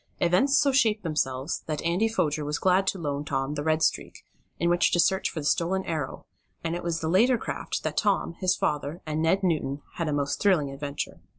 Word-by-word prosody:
Events 185 +12 +3
so 290 -2 +4
shaped 225 -5 +2
themselves 140 -3 -1
that 155 -2 -3
Andy 175 +6 +2
Foger 155 -9 0
was 150 +1 -2
glad 190 +1 +2
to 195 - 0
loan 145 -4 -3
Tom 135 -1 -2
the 145 - -3
Red 160 0 +1
Streak - - -1 0.3
in 170 - 0
which 175 0 +3
to 175 - +3
search 190 +2 +2
for 160 - -5
the - - -7
stolen 185 +5 +1
Arrow, 155 -5 -4 0.4
and 165 0 -1
it 175 - -4
was 165 -1 -2
in - - 0
the 165 - 0
later 240 +6 +4
craft - - -4
that - - -3
Tom, 200 -5 +1
his 185 -1 +2
father 150 +3 -2
and 155 0 -2
Ned 190 +5 +2
Newton 150 -5 -1
had 170 - -1
a - - 0
most 145 -1 -1
thrilling 170 -9 +3
adventure. 140 +1 -5
165 Hz, 220 wpm, -26 LUFS, 150-190 Hz, 0.4 s, so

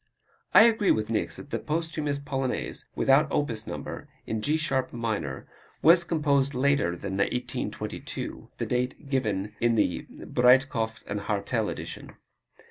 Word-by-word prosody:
I - - +11
agree 225 -3 +4
with 110 +1 +2
Niecks 110 - -1
that 145 - -10
the - - -1
posthumous 155 -2 -2
Polonaise, 135 -2 -3
without 140 +3 +4
opus 115 -7 -1
number, - - -6 0.2
in 110 -1 -2
G 150 +7 +1
sharp 135 -4 -1
minor, 110 - -3 0.4
was 170 +3 +7
composed 145 -5 +1
later 130 -10 +2
than 95 0 -4
1822 125 +5 -3
the - - -2
date 125 +3 -2
given 105 -7 -1
in 120 0 +3
the 95 -5 0
Breitkopf 125 -3 +2 0.2
& 100 - -9
Hartel 105 +2 0
edition. - - -7
130 Hz, 135 wpm, -27 LUFS, 110-145 Hz, 0.4 s, I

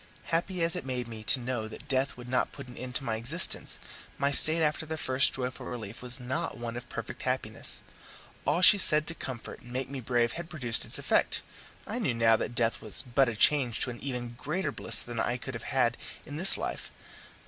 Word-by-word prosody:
Happy 175 +1 0
as 165 0 +1
it - - -3
made 125 -2 -3
me 110 -2 -8
to 130 - +4
know 120 -3 -3
that 110 - -10
death 135 0 0
would 120 0 -10
not 125 0 0
put 140 -2 -9
an 125 - -11
end 125 0 -7
to 140 - -1
my 110 -3 -1
existence, 145 +10 +1 0.4
my 140 0 +1
state 155 +3 +5
after 155 +1 +1
the 160 0 -4
first 130 -2 +3
joyful 130 -1 -4
relief 115 -3 -7
was 125 +1 +2
not 125 +2 -3
one 120 0 -5
of 120 - -8
perfect - - -6
happiness. - - -2 0.6
All 175 - +1
she 205 +2 +9
said 155 -4 +5
to 165 - -1
comfort 130 -7 -7
and 120 - -14
make 130 +1 -3
me 140 - -4
brave 120 -1 +1
had 170 +4 -6
produced 125 -9 0
its - - -5
effect - - +1 0.4
I - - -4
knew 120 - 0
now 115 -1 +5
that 120 - -4
death 115 -1 0
was 110 - +5
but 125 +1 +2
a 115 - -4
change 125 0 +3
to 125 - +1
an 120 - -9
even 125 -3 -5
greater 180 +8 -2
bliss 110 -2 -2
than 120 -1 -6
I 120 - 0
could 120 - -7
have - - 0 0.3
in 145 - -8
this 185 +4 +4
life. - - -4
125 Hz, 220 wpm, -29 LUFS, 120-145 Hz, 0.6 s, she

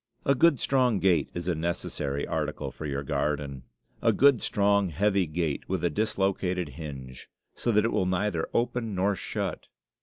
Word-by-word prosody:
A 140 - +5
good, 145 0 +4
strong 125 -4 +2
gate 95 -3 +2
is 85 0 -4
a 90 - +2
necessary 75 -4 -2
article - - -3
for 75 - -6
your 70 0 -2
garden. 70 -2 -2 0.4
A - - +4
good, 140 -3 +5
strong, 100 -1 +2
heavy 95 +2 +1
gate, 80 -2 -2
with 95 -2 -1
a 85 - +1
dislocated 95 -3 0
hinge, 65 -3 -8 0.2
so 120 - -1
that 105 0 +3
it 115 - +1
will 90 - +1
neither 90 -2 0
open 120 -3 -1
nor 100 +2 +1
shut. - - -4
90 Hz, 170 wpm, -28 LUFS, 75-105 Hz, 0.4 s, A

